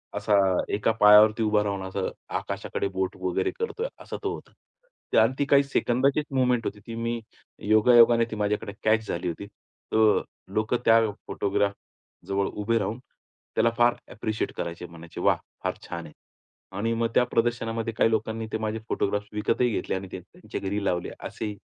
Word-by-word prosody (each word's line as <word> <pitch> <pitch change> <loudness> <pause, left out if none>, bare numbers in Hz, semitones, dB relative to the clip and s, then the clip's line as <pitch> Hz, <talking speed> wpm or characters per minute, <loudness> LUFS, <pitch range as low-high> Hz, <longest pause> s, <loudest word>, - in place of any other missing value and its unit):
असा 105 +1 0 0.4
एका 105 +2 +2
पायावरती 105 +2 +7
उभा 105 -1 +2
राहून 100 -1 -2
असं 95 0 -2 0.3
आकाशाकडे - - -3
बोट 95 0 -2
वगैरे 90 -1 0
करतोय 460 +1 -2
असा - - -7
तो - - -1
होता. - - -10 0.7
आणि 115 +3 +3
ती 145 - +2
काही 140 0 +5
सेकंदाचीच 140 +1 +1
मूव्हमेंट 125 -3 +2
होती. 105 - -4
ती 115 +2 -8
मी 115 0 -2 0.5
योगायोगाने 115 +1 +6
ती - - -3
माझ्याकडे 105 -1 -1
कॅच 110 0 +2
झाली 85 +1 -3
होती. 85 +3 -4
तर 110 +1 0 0.3
लोकं 110 +3 +1
त्या 115 0 +7 0.3
फोटोग्राफजवळ 100 -1 -2
उभे 105 +3 -1
राहून 115 +3 -3 0.6
त्याला 115 - +4
फार 120 0 +4 0.2
अप्रिशिएट 110 0 -3
करायचे. 85 +1 -4
म्हणायचे, 85 -1 -10
"वाह! - - +4 0.3
फार - - 0
छान 85 -1 -5
आहे." - - -12 0.6
आणि 115 +3 0
मग 115 - +1
त्या - - +6
प्रदर्शनामध्ये 115 -1 0
काही 110 - +3
लोकांनी 110 0 -1
ते - - +1
माझे 110 0 -3
फोटोग्राफ्स 105 +1 -1
विकतही 115 +3 +1
घेतले - - -2
आणि 95 0 -5
ते - - -5
त्यांच्या 135 - -9
घरी 100 +1 -2
लावले 90 -2 0
असेही 105 -2 -5
110 Hz, 165 wpm, -26 LUFS, 100-115 Hz, 0.7 s, पायावरती